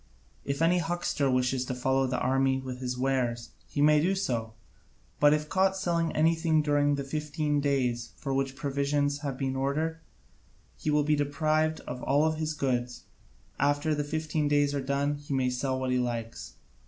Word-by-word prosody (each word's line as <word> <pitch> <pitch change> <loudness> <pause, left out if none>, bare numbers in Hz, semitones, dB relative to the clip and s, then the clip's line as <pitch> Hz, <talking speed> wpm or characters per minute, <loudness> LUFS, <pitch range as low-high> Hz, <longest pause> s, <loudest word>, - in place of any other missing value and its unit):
If 140 +3 -1
any 175 +2 +4
huckster 165 -4 -1
wishes 125 0 +1
to 125 - -3
follow 130 +1 +1
the 125 0 -1
army 130 +1 +1
with 130 -1 -6
his 125 -1 -3
wares, 125 -3 -1 0.2
he 145 - 0
may 150 0 +5
do 185 +5 +1
so, 115 - -2 0.7
but 145 0 +6
if 150 0 +1
caught 190 +2 +2
selling 170 -3 0
anything 160 0 +2
during 145 -1 +2
the 140 - -3
fifteen 150 +1 -1
days 125 -4 0
for 135 -2 -3
which 135 0 -1
provisions 145 0 0
have 140 -3 -4
been 135 -1 -2
ordered, 155 +5 -1 0.8
he - - -4
will 150 0 +3
be 150 +1 +2
deprived 155 +2 0
of 125 0 -7
all 150 +3 +2
his 155 0 -3
goods: 125 -4 -2 0.6
after 145 +2 +2
the 150 0 -1
fifteen 155 0 -1
days 145 -1 +2
are 140 - -1
done 140 +2 0
he 145 -1 -4
may 130 -1 +1
sell 130 +1 -1
what 130 -1 -1
he 125 - +2
likes. 115 -2 -4
145 Hz, 180 wpm, -28 LUFS, 130-155 Hz, 0.8 s, but